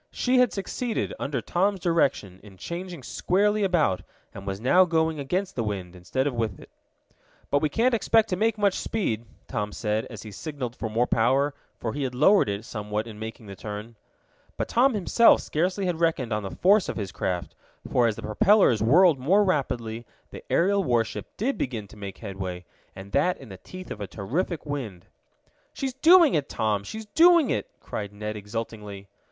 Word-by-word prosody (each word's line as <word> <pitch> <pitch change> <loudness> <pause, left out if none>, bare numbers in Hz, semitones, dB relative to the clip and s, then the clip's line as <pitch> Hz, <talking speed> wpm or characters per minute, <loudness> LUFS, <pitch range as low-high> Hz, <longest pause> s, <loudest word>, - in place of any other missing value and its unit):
She 255 0 +1
had 250 -3 +4
succeeded, 225 +4 -3
under 140 -1 -2
Tom's 195 +2 0
direction, 140 - 0
in 100 -2 -15
changing 170 - -6
squarely 205 - +1
about, 165 - +2 0.3
and 100 0 -9
was 95 0 -3
now 155 - +5
going 160 -3 0
against 180 +8 -2
the 120 - -1
wind, 95 -4 -4
instead 90 +10 -2
of 145 - 0
with 115 -5 -2
it. - - -15 0.8
"But 140 - +4
we 155 - +1
can't 240 - +2
expect 225 -1 +3
to 180 - 0
make 220 +3 +1
much 200 -2 +2
speed," 120 - -2 0.2
Tom 105 0 -3
said, 105 +1 -2
as 110 -3 -9
he 110 - -9
signaled 130 +1 -5
for 110 - -4
more 115 +3 +1
power, 135 +5 +2 0.2
for 115 - -4
he 145 - -4
had 130 -2 -2
lowered 155 - +5
it 100 +2 -4
somewhat 105 -1 -3
in 110 -2 -10
making 110 0 -7
the 100 -1 -9
turn. 105 +4 -7 0.6
But - - -2
Tom 250 +1 +3
himself 210 +4 +5
scarcely 185 +5 -1
had 175 -3 -1
reckoned 160 -9 +1
on 105 - -1
the 100 - -5
force 200 +2 +4
of - - -4
his 100 -4 -4
craft, 90 -2 -3 0.3
for 120 -2 +3
as 110 - 0
the - - -9
propellers 125 - +4
whirled 155 - +5
more 190 +11 +4
rapidly 120 - -2 0.2
the - - -9
aerial 200 +3 +3
warship 120 -7 0
did 260 +7 -1
begin 115 -6 -3
to - - -14
make 100 -2 -8
headway, 95 -4 -6 0.3
and 95 +1 -10
that 180 - +2
in 135 - -13
the 95 - -9
teeth 185 - -10
of 105 - -6
a 100 - -4
terrific 155 - -3
wind. 125 - -5 0.7
"She's 265 -1 -3
doing 330 +3 +6
it, 145 -3 0
Tom! 105 -2 0
She's 220 - -7
doing 335 +6 +5
it!" - - -2
cried 100 -1 -5
Ned 105 +1 -5
exultingly. 105 -1 -6
130 Hz, 190 wpm, -26 LUFS, -, 0.8 s, doing